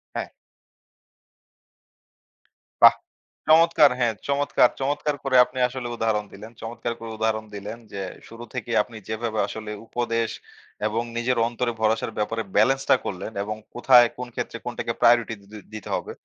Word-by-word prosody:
হ্যাঁ। -, -, -2 dB, 2.6 s
বাহ! -, -, +11 dB, 0.5 s
চমৎকার 160 Hz, -2 st, +6 dB
হ্যাঁ, 120 Hz, -2 st, +2 dB
চমৎকার, 140 Hz, -3 st, +3 dB
চমৎকার, 145 Hz, +2 st, -1 dB
করে 135 Hz, -1 st, 0 dB
আপনি 130 Hz, -, -8 dB
আসলে 125 Hz, -1 st, -6 dB
উদাহরণ 110 Hz, -2 st, 0 dB
দিলেন। 110 Hz, +3 st, -10 dB
চমৎকার 120 Hz, +1 st, -4 dB
করে 115 Hz, 0 st, -7 dB
উদাহরণ 110 Hz, 0 st, 0 dB
দিলেন 105 Hz, +3 st, -6 dB
যে, 100 Hz, -, -6 dB, 0.3 s
শুরু 115 Hz, +1 st, -10 dB
থেকেই 120 Hz, -2 st, -2 dB
আপনি 115 Hz, 0 st, -12 dB
যেভাবে 110 Hz, 0 st, -2 dB
আসলে 110 Hz, 0 st, -6 dB, 0.2 s
উপদেশ 115 Hz, -2 st, -1 dB, 0.6 s
এবং 115 Hz, +2 st, -1 dB
নিজের 120 Hz, +1 st, 0 dB
অন্তরে 120 Hz, 0 st, -2 dB
ভরসার 110 Hz, +1 st, +1 dB
ব্যাপারে 110 Hz, +1 st, -1 dB
balance 135 Hz, +6 st, +3 dB
টা -, -, +8 dB
করলেন 95 Hz, +3 st, -4 dB
এবং 105 Hz, +1 st, -4 dB, 0.2 s
কোথায় 120 Hz, 0 st, +6 dB
কোন 125 Hz, 0 st, -5 dB
ক্ষেত্রে -, -, -4 dB
কোনটাকে -, -, -3 dB
priority 115 Hz, -1 st, +4 dB
দি -, -, -20 dB, 0.3 s
দিতে 110 Hz, -3 st, -7 dB
হবে -, -, -4 dB
115 Hz, 145 wpm, -24 LUFS, 110-125 Hz, 2.6 s, বাহ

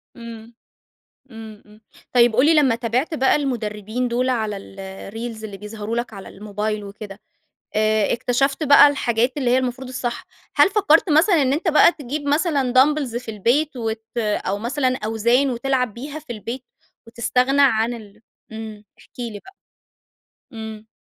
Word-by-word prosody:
امم، 230 Hz, -1 st, -10 dB, 0.8 s
امم، 220 Hz, -2 st, -11 dB
امم. 210 Hz, +1 st, -19 dB, 0.3 s
طيب 240 Hz, -2 st, +4 dB
قُل 260 Hz, +4 st, +5 dB
لي 325 Hz, -, +5 dB
لما 275 Hz, -6 st, +4 dB
تابعت 240 Hz, +7 st, -1 dB
بقى 265 Hz, -1 st, +3 dB
المدربين 235 Hz, -3 st, -3 dB
دول 245 Hz, +2 st, 0 dB
على 220 Hz, -5 st, -1 dB
الreels 200 Hz, +4 st, -8 dB
اللي 205 Hz, -2 st, -7 dB
بيظهروا 210 Hz, +2 st, -6 dB
لَك 240 Hz, -1 st, -3 dB
على 195 Hz, -2 st, -9 dB
الموبايل 210 Hz, +1 st, -4 dB
وكده، 200 Hz, 0 st, -10 dB, 0.6 s
آآ 215 Hz, -1 st, +2 dB
اكتشفت 270 Hz, +5 st, 0 dB
بقى 290 Hz, 0 st, +8 dB
الحاجات 245 Hz, -2 st, 0 dB
اللي 260 Hz, -4 st, 0 dB
هي 255 Hz, -, +4 dB
المفروض 255 Hz, 0 st, -3 dB
الصح. 255 Hz, +7 st, -4 dB, 0.3 s
هل -, -, +6 dB
فكرت 385 Hz, -4 st, +3 dB
مثلًا 320 Hz, +1 st, +4 dB
إن 265 Hz, 0 st, +2 dB
أنتَ 320 Hz, +6 st, -2 dB
بقى 320 Hz, +2 st, +6 dB
تجيب 290 Hz, 0 st, -6 dB
مثلًا 285 Hz, -4 st, +1 dB
دامبلز 270 Hz, -2 st, +3 dB
في 240 Hz, -2 st, -4 dB
البيت 255 Hz, +8 st, 0 dB
وت 225 Hz, -1 st, -3 dB
أو 210 Hz, -3 st, -1 dB
مثلًا 255 Hz, +2 st, 0 dB
أوزان 235 Hz, +5 st, +2 dB
وتلعب 250 Hz, -2 st, -1 dB
بيها 285 Hz, +5 st, -7 dB
في 295 Hz, -6 st, -8 dB
البيت؟ 235 Hz, +4 st, -6 dB, 0.4 s
وتستغنى 250 Hz, +4 st, +1 dB
عن 235 Hz, -3 st, +3 dB
ال 215 Hz, -2 st, -12 dB, 0.3 s
امم، 220 Hz, -1 st, -8 dB, 0.2 s
احكِ -, -, -20 dB
لي 230 Hz, -4 st, -5 dB
بقى. 380 Hz, -, -17 dB, 1.0 s
امم. 220 Hz, -1 st, -8 dB
240 Hz, 155 wpm, -21 LUFS, 220-270 Hz, 1.0 s, بقى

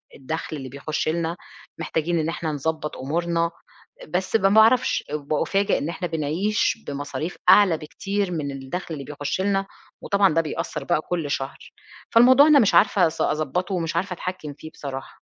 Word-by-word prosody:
الدخل 155 Hz, +2 st, -5 dB
اللي 130 Hz, -1 st, -7 dB
بيخش 150 Hz, +4 st, -3 dB
لنا، 170 Hz, +1 st, -1 dB, 0.4 s
محتاجين 165 Hz, +1 st, -1 dB
إن 155 Hz, 0 st, -1 dB
إحنا 165 Hz, -1 st, -3 dB
نضبط 150 Hz, +1 st, -3 dB
أمورنا." 170 Hz, +4 st, -1 dB, 0.6 s
بس 185 Hz, +6 st, -2 dB
ما 195 Hz, -3 st, +4 dB
باعرفش، 220 Hz, +4 st, +4 dB
بأُفاجأ 155 Hz, +7 st, 0 dB
إن 150 Hz, -, -3 dB
إحنا 175 Hz, +1 st, -3 dB
بنعيش 170 Hz, +8 st, 0 dB
بمصاريف 145 Hz, +4 st, -4 dB
أعلى 190 Hz, -6 st, +6 dB
بكتير 195 Hz, +5 st, -3 dB
من 150 Hz, -4 st, -3 dB
الدخل 135 Hz, +6 st, -5 dB
اللي 140 Hz, -3 st, -6 dB
بيخش 145 Hz, +4 st, -3 dB
لنا، 195 Hz, 0 st, +1 dB, 0.4 s
وطبعًا 200 Hz, -3 st, +3 dB
ده 165 Hz, -, +3 dB
بيأثّر 155 Hz, -1 st, -4 dB
بقى 150 Hz, -, +1 dB
كل 165 Hz, -5 st, -2 dB
شهر، 135 Hz, 0 st, -3 dB, 0.6 s
فالموضوع 255 Hz, +5 st, +7 dB
أنا 300 Hz, -2 st, +7 dB
مش 210 Hz, -, +3 dB
عارفة 195 Hz, -3 st, +5 dB
أص 160 Hz, -, -5 dB
أضبطه، 175 Hz, +6 st, -1 dB
ومش 165 Hz, -2 st, -2 dB
عارفة 180 Hz, +2 st, -1 dB
أتحكم 180 Hz, -4 st, -6 dB
فيه 155 Hz, +2 st, -11 dB
بصراحة. 135 Hz, -3 st, -8 dB
165 Hz, 160 wpm, -23 LUFS, 150-190 Hz, 0.6 s, فالموضوع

